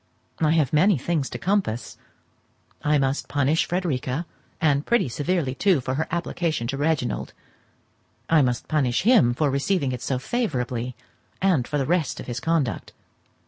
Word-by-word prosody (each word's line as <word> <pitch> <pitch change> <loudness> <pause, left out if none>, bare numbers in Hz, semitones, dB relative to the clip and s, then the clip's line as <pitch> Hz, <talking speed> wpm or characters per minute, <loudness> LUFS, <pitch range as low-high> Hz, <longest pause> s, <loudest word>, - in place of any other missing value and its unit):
I 155 -1 +3
have 155 -4 +1
many 185 +4 +4
things 150 0 -1
to - - -5
compass: 190 - -1 0.9
I 150 0 +2
must 135 0 0
punish 145 +3 +1
Frederica, 155 -4 -2 0.3
and 145 -2 +2
pretty 235 -5 +2
severely 145 +2 -1
too, 185 +3 +2
for 130 +1 -3
her 155 +4 -1
application 170 -5 -2
to 135 - -2
Reginald; 145 -4 -1 0.9
I 160 -2 +5
must 125 -2 0
punish 135 -5 +1
him 200 - +5
for 145 0 +1
receiving 140 +1 0
it 125 -1 -5
so 130 +1 -1
favourably, 125 - -2 0.4
and 180 -10 +2
for 150 - -1
the 135 - 0
rest 165 -1 0
of - - -7
his 120 0 -4
conduct. 155 -7 -1
145 Hz, 155 wpm, -24 LUFS, 130-170 Hz, 0.9 s, I